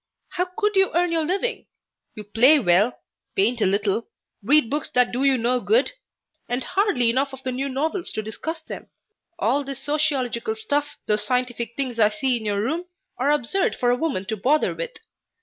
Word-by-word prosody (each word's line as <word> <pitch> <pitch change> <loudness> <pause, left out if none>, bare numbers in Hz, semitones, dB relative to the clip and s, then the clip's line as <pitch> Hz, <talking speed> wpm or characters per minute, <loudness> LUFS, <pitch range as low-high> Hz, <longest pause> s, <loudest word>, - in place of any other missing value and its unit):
How 360 0 -1
could 420 -1 +1
you 385 -1 +4
earn 350 0 +2
your 325 -1 +1
living? 400 +8 -2 0.5
You 215 - -7
play 235 +9 +5
well, 205 0 +3 0.4
paint 225 +4 +1
a - - +4
little, 200 +3 0 0.3
read 275 +4 +4
books 290 +4 -2
that 250 -1 +4
do 250 +3 -1
you 270 -1 +4
no 245 +2 +1
good, 450 - +2 0.6
and 245 +1 -1
hardly 285 - +2
enough 270 +3 0
of 265 0 -9
the 260 - -2
new 270 +2 -2
novels 315 +7 -2
to 215 - -3
discuss 315 +10 -5
them. - - -9 0.5
All 285 -3 +1
this 275 -1 -7
sociological 290 - 0
stuff, 290 -10 -2
those 210 -1 +2
scientific 240 0 -2
things 255 -4 -3
I 210 -1 +6
see 265 +1 0
in 225 -2 -4
your 205 -1 0
room, 320 +9 -2 0.3
are 270 +3 +2
absurd 295 +6 +1
for 245 -1 +1
a - - +3
woman 255 -9 -2
to 220 - -2
bother 285 +9 +2
with. - - -5
265 Hz, 190 wpm, -23 LUFS, 230-310 Hz, 0.6 s, I